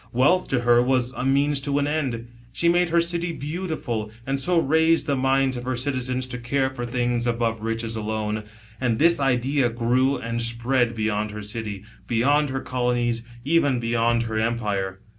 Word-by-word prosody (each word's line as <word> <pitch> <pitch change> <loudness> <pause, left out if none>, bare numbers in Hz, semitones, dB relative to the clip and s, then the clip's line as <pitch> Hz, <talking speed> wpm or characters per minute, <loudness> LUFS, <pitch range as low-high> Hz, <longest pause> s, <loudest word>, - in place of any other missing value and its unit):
Wealth 150 +10 +3
to 130 -2 0
her 120 0 +5
was 125 -1 +1
a 130 - -5
means 140 +2 +2
to 140 0 -1
an 145 - +1
end; 135 -6 -2 0.2
she 170 - 0
made 175 0 +3
her 170 +1 +3
city 170 0 0
beautiful, 150 - -4 0.2
and 135 0 -1
so 180 +4 +2
raised 160 +2 +3
the 140 - +1
minds 135 0 +1
of 120 - -6
her 130 +1 -2
citizens 130 0 -1
to 125 -1 -5
care 130 +2 0
for 120 -2 -5
things 120 -1 0
above 115 -2 -1
riches 115 0 -2
alone. 110 0 -3 0.3
And 120 -4 0
this 170 +3 +4
idea 135 0 +1
grew 125 +4 +1
and 115 +1 -3
spread 120 +1 0
beyond 110 -1 -1
her 105 0 -7
city, 105 -1 -5 0.2
beyond 145 +6 +2
her 135 0 -3
colonies, 120 -2 0 0.2
even 145 -4 +2
beyond 115 0 +1
her 110 -1 -2
empire. 105 -4 -2
125 Hz, 180 wpm, -24 LUFS, 115-140 Hz, 0.3 s, her